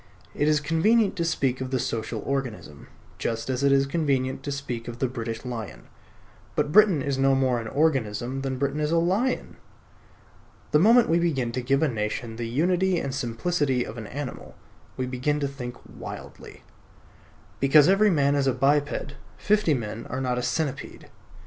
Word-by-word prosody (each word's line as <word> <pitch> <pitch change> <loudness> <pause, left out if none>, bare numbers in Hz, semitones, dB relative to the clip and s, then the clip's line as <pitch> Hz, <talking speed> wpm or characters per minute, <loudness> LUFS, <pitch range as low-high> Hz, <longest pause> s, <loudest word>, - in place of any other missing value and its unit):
It 145 - 0
is 155 -1 +3
convenient 195 +9 +2
to 170 - 0
speak 135 -6 0
of 130 - -3
the 130 - 0
Social 110 -2 -3
Organism, 125 - -4 0.3
just 115 +2 -2
as 130 +1 -2
it 140 - +4
is 135 0 +4
convenient 135 -4 -1
to 145 - -4
speak 125 -5 -5
of 120 -1 -6
the 130 - 0
British 115 -1 -5
Lion. 115 -4 -6 0.7
But 145 - 0
Britain 195 -7 +5
is 140 -1 -1
no 135 0 +4
more 130 -2 +1
an 115 - -6
organism 130 -3 0
than 135 -1 -3
Britain 140 +2 -1
is 150 0 0
a 170 - +3
lion. 195 +10 0 1.1
The 150 - +5
moment 230 +7 +6
we 165 +1 +3
begin 135 -9 0
to 130 +2 -3
give 135 +4 +1
a - - +4
nation 110 -1 -3
the 120 -1 -3
unity 180 +7 +1
and 140 -5 -3
simplicity 130 +1 0
of 110 - -8
an 110 - -7
animal, 140 +1 -7 0.4
we 130 - -1
begin 130 +4 -1
to 140 - 0
think 125 -3 -7
wildly. - - -10 1.0
Because 140 +2 +6
every 200 +3 +5
man 145 -5 +2
is 140 -1 +1
a 135 - +3
biped, 140 +1 0 0.2
fifty 210 -7 +2
men 115 -1 -5
are 130 - -4
not 125 -2 -1
a - - -1
centipede. 140 +3 -3
135 Hz, 180 wpm, -25 LUFS, 125-155 Hz, 1.1 s, moment